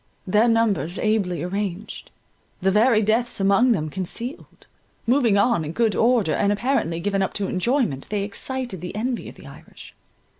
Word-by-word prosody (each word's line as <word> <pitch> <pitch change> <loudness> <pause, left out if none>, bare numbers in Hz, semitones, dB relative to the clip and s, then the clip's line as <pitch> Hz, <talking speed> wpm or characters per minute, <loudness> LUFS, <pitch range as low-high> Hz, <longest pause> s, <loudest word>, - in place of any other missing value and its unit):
Their 210 +5 +3
numbers 225 -6 +1
ably 195 -6 0
arranged; 195 +2 -4 0.5
the 190 +1 +1
very 220 +2 +4
deaths 225 +3 0
among 200 +6 +4
them 155 -8 -1
concealed; 195 - -6 0.4
moving 240 -4 +3
on 205 -4 +2
in 155 +1 -5
good 225 0 +1
order, 230 -8 +2
and 200 0 +1
apparently 205 -7 0
given 195 +2 -1
up 190 - -1
to 205 - -1
enjoyment, 190 - -1
they 205 -1 -1
excited 245 0 -3
the 180 +2 -6
envy 240 +3 -3
of - - -13
the - - -15
Irish. - - -13
210 Hz, 160 wpm, -23 LUFS, 190-235 Hz, 0.5 s, very